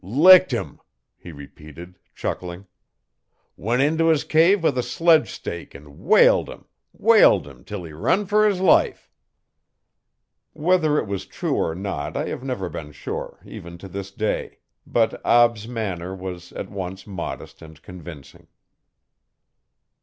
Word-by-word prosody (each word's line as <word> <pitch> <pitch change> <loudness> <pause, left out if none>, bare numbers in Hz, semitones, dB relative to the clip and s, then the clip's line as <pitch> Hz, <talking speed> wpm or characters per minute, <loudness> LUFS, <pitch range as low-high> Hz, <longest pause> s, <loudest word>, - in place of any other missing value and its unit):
'Licked 165 - +6
'im,' 120 - -4 0.4
he 85 - -12
repeated 75 +4 -13 0.2
chucking. 90 +2 -5 0.9
'Went 120 +6 0
into 160 +3 +1
his 160 -3 +3
cave 165 +4 +3
with 150 -5 +2
a 125 - +1
sledge 165 +4 +3
stake 85 -1 -8
an' 70 0 -14
whaled - - +4
'im - - -11 0.3
whaled - - +4
'im 70 -3 -14
'til 105 -4 -7
he 80 -2 -10
run 190 - 0
fer 210 +2 +3
his 195 -3 -2
life.' 185 -2 +2 1.4
Whether 160 -2 +2
it - - 0
was 100 -2 -5
true - - -3
or 80 - -1
not 95 -6 -4
I - - -2
have - - -6
never 125 -9 -3
been 75 -3 -8
sure, 70 - -7
even 85 0 -10
to 95 - -11
this 95 +1 -7
day, 105 +2 -3 0.3
but 115 -1 0
Ab's 120 -2 +3
manner 95 -6 -4
was 90 -2 -8
at - - -7
once 95 -1 -6
modest 95 -4 -7
and 80 -2 -13
convincing. 80 -4 -12
100 Hz, 145 wpm, -22 LUFS, -, 1.4 s, Licked